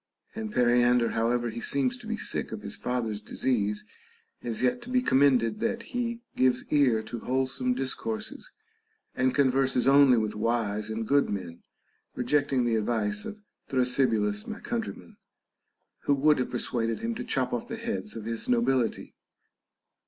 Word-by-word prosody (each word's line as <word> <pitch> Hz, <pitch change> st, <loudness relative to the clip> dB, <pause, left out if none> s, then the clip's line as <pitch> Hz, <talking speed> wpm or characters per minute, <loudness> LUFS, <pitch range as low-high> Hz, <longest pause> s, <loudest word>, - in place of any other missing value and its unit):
And 220 Hz, -1 st, -5 dB
Periander, 120 Hz, -, +3 dB
however 120 Hz, +1 st, 0 dB
he 115 Hz, -, -6 dB
seems 140 Hz, -, 0 dB
to 230 Hz, -, -11 dB
be 225 Hz, 0 st, -2 dB
sick -, -, -1 dB
of -, -, -6 dB
his -, -, -4 dB
father's 115 Hz, -4 st, -2 dB
disease, 105 Hz, -2 st, -1 dB, 0.6 s
is 120 Hz, 0 st, -3 dB
yet 125 Hz, -, +1 dB
to 240 Hz, -, -10 dB
be 250 Hz, 0 st, +2 dB
commended 130 Hz, -, +3 dB
that 230 Hz, 0 st, -1 dB
he 235 Hz, -1 st, -2 dB
gives 130 Hz, -1 st, +2 dB
ear 130 Hz, -7 st, +3 dB
to 115 Hz, +2 st, -6 dB
wholesome 130 Hz, 0 st, -1 dB
discourses 220 Hz, -, -3 dB, 0.6 s
and 130 Hz, 0 st, +1 dB
converses 135 Hz, -2 st, +2 dB
only 135 Hz, -2 st, +6 dB
with 110 Hz, -1 st, 0 dB
wise 110 Hz, -1 st, -1 dB
and 110 Hz, 0 st, -3 dB
good 140 Hz, +2 st, +3 dB
men, 90 Hz, -4 st, -5 dB, 0.5 s
rejecting 135 Hz, 0 st, +1 dB
the 115 Hz, -1 st, +2 dB
advice 105 Hz, -2 st, -1 dB
of 210 Hz, 0 st, -8 dB, 0.3 s
Thrasybulus 120 Hz, -5 st, +1 dB
my -, -, -6 dB
countryman, -, -, -5 dB, 0.9 s
who 145 Hz, -, +3 dB
would 150 Hz, +1 st, +3 dB
have 125 Hz, -, -1 dB
persuaded 115 Hz, -2 st, -2 dB
him 230 Hz, 0 st, -1 dB
to -, -, -5 dB
chop 130 Hz, -2 st, -1 dB
off 120 Hz, -, -3 dB
the 230 Hz, -, -4 dB
heads 230 Hz, -2 st, -4 dB
of 110 Hz, -, -7 dB
his 115 Hz, 0 st, -4 dB
nobility. 125 Hz, 0 st, +1 dB
125 Hz, 155 wpm, -28 LUFS, 115-140 Hz, 0.9 s, only